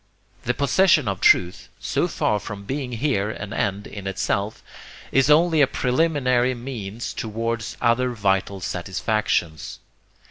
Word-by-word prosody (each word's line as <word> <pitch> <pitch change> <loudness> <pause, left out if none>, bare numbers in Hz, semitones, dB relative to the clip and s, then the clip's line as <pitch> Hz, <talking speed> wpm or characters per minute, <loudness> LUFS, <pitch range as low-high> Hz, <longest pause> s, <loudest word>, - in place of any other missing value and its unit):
The 120 0 0
possession 150 - +3
of 95 -2 -2
truth, 90 0 +3
so - - 0
far 105 - 0
from 100 0 -8
being 130 +3 -4
here 115 -5 0
an 100 0 -6
end 100 +1 -1
in 100 -2 -8
itself, 100 +2 -2 0.5
is 135 +1 +3
only 160 +1 +5
a 140 - +6
preliminary 125 -3 +1
means 120 -3 -6
towards 115 0 -3
other 125 +1 +2
vital 100 -4 0
satisfactions. 90 -3 -2
115 Hz, 130 wpm, -23 LUFS, 100-130 Hz, 0.5 s, a